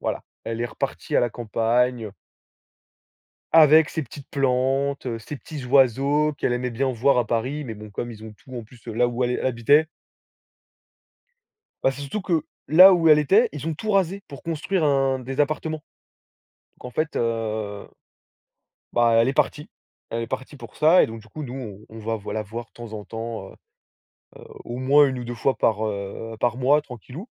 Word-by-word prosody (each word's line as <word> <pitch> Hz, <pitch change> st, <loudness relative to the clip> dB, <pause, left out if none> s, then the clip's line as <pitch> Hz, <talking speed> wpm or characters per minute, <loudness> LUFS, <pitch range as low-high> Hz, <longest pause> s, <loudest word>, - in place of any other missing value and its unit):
voilà, -, -, -3 dB, 0.2 s
elle 115 Hz, 0 st, -4 dB
est 120 Hz, -, 0 dB
repartie -, -, -3 dB
à -, -, +5 dB
la 120 Hz, -, +2 dB
campagne 115 Hz, 0 st, 0 dB, 1.4 s
avec 155 Hz, -1 st, +7 dB
ses 160 Hz, -, -2 dB
petites 140 Hz, +3 st, -12 dB
plantes, 135 Hz, 0 st, 0 dB
ses 130 Hz, +6 st, -7 dB
petits 145 Hz, -1 st, -8 dB
oiseaux, 140 Hz, +3 st, +3 dB
qu'elle 120 Hz, -, 0 dB
aimait 125 Hz, 0 st, -1 dB
bien 130 Hz, +3 st, -1 dB
voir 125 Hz, +3 st, +3 dB
à 120 Hz, -, +1 dB
Paris, 130 Hz, +7 st, -2 dB
mais 115 Hz, -4 st, -6 dB
bon 105 Hz, 0 st, -11 dB
comme 120 Hz, +4 st, -5 dB
ils 110 Hz, -, -12 dB
ont 110 Hz, -1 st, -9 dB
tout 130 Hz, +5 st, -14 dB
en 120 Hz, -, -5 dB
plus 115 Hz, +2 st, -18 dB
là 120 Hz, +2 st, +1 dB
où 120 Hz, +1 st, -1 dB
elle 125 Hz, 0 st, -1 dB
habitait 130 Hz, +5 st, +3 dB, 2.0 s
Bah, -, -, +4 dB
c'est 135 Hz, +2 st, -7 dB
surtout 175 Hz, +10 st, -4 dB
que, 170 Hz, -3 st, +1 dB, 0.3 s
là 185 Hz, +5 st, +9 dB
où 165 Hz, -2 st, +3 dB
elle 150 Hz, -, +8 dB
était, 200 Hz, -, +4 dB
ils 150 Hz, +1 st, -6 dB
ont 165 Hz, -, 0 dB
tout 215 Hz, +8 st, -4 dB
rasé 195 Hz, 0 st, +1 dB
pour 140 Hz, -, -10 dB
construire 165 Hz, +2 st, -1 dB
un 135 Hz, -2 st, +2 dB
des 130 Hz, +2 st, -4 dB
appartements. 155 Hz, +1 st, -1 dB, 0.9 s
Donc -, -, -19 dB
en 125 Hz, -, -6 dB
fait, 155 Hz, +5 st, -2 dB
heu, 110 Hz, -3 st, -2 dB, 1.0 s
bah, 120 Hz, -1 st, +3 dB
elle 115 Hz, +2 st, +4 dB
est -, -, +1 dB
partie 150 Hz, +1 st, -1 dB, 0.4 s
elle 115 Hz, 0 st, -2 dB
est 115 Hz, -, -4 dB
partie 135 Hz, +3 st, -6 dB
pour 115 Hz, -4 st, -12 dB
ça, 160 Hz, +4 st, +5 dB
et -, -, +3 dB
donc 115 Hz, 0 st, -8 dB
du 110 Hz, -, -18 dB
coup 155 Hz, +8 st, -8 dB
nous, 120 Hz, -6 st, -7 dB
on 110 Hz, -, -11 dB
on -, -, -7 dB
va 110 Hz, +1 st, -2 dB
v 105 Hz, -, -12 dB
va -, -, -3 dB
la 110 Hz, -, -2 dB
voir 115 Hz, +3 st, -7 dB
de -, -, -40 dB
temps 115 Hz, -2 st, -9 dB
en 105 Hz, -, -6 dB
temps, 115 Hz, -3 st, -6 dB
heu, -, -, -17 dB, 1.1 s
au 120 Hz, -, -6 dB
moins 140 Hz, +3 st, +5 dB
1 130 Hz, -, -4 dB
ou 120 Hz, -, -5 dB
2 120 Hz, +1 st, -5 dB
fois 130 Hz, +3 st, 0 dB
par, 110 Hz, -1 st, +1 dB
heu, 105 Hz, +2 st, -5 dB
par 120 Hz, +1 st, 0 dB
mois 145 Hz, +4 st, +3 dB
tranquillou 130 Hz, -, -10 dB
125 Hz, 195 wpm, -24 LUFS, 115-145 Hz, 2.0 s, là